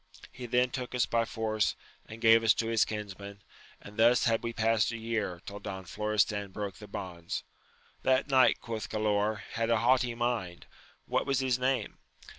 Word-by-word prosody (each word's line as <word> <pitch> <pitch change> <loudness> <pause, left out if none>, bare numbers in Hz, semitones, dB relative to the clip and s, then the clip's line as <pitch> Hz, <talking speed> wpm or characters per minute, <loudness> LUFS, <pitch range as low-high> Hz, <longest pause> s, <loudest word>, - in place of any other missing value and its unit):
He 125 -1 -8
then 125 +1 +2
took 125 -1 -4
us 125 - +3
by 115 0 +1
force, 110 -2 -1 0.3
and 110 - -9
gave 115 0 +7
us 110 - +5
to 115 - -1
his 115 -1 +3
kinsmen, 100 -1 -7 0.4
and 105 +1 -13
thus 120 +2 +5
had 115 -3 +2
we 115 - -3
past 115 -1 +2
a 115 - -4
year, 110 -6 -3
till 100 0 -7
Don 95 -2 -6
Florestan 105 +1 0
broke 100 -1 -5
the 105 - -11
bonds. 90 -5 -5 0.6
That 130 0 +2
knight, 130 -2 +4
quoth 115 -2 -5
Galaor, 105 -1 0
had 115 0 -1
a 115 - +4
haughty 120 +1 +2
mind: 115 -7 -2 0.4
what - - -1
was 135 -2 +2
his 130 -2 +1
name 130 +1 -1
110 Hz, 180 wpm, -30 LUFS, 105-120 Hz, 0.6 s, gave